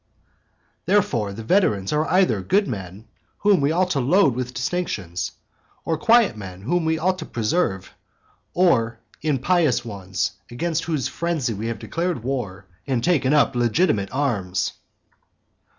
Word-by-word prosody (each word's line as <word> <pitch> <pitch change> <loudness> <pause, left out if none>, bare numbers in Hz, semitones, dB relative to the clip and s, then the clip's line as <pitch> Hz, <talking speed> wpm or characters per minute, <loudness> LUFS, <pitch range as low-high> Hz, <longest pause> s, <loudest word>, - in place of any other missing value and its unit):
Therefore 145 - +2
the 110 +3 -7
veterans 110 - +2
are 150 +1 +1
either 180 - +3
good 200 - +2
men, 100 -2 -7 0.3
whom 200 -6 +3
we 140 +2 +2
ought 180 +2 +1
to 145 - +1
load 145 +3 +4
with 125 +1 -3
distinctions, 120 - -3 0.5
or 165 - +1
quiet 235 - +4
men, 95 -3 -9
whom 175 +8 0
we 160 0 +1
ought 185 +3 0
to - - -5
preserve, 110 - -1 0.6
or 120 -11 +3 0.2
impious 150 -3 +1
ones, 100 -4 -3 0.2
against 160 +7 -2
whose 155 -7 -1
frenzy 160 -8 -2
we 110 +2 -4
have 115 - -3
declared 170 -7 -3
war 110 -8 -4 0.2
and 130 -4 0
taken 150 -7 +2
up 145 -3 +3
legitimate 120 - +1
arms. 105 -10 -1
135 Hz, 140 wpm, -23 LUFS, 110-175 Hz, 0.6 s, load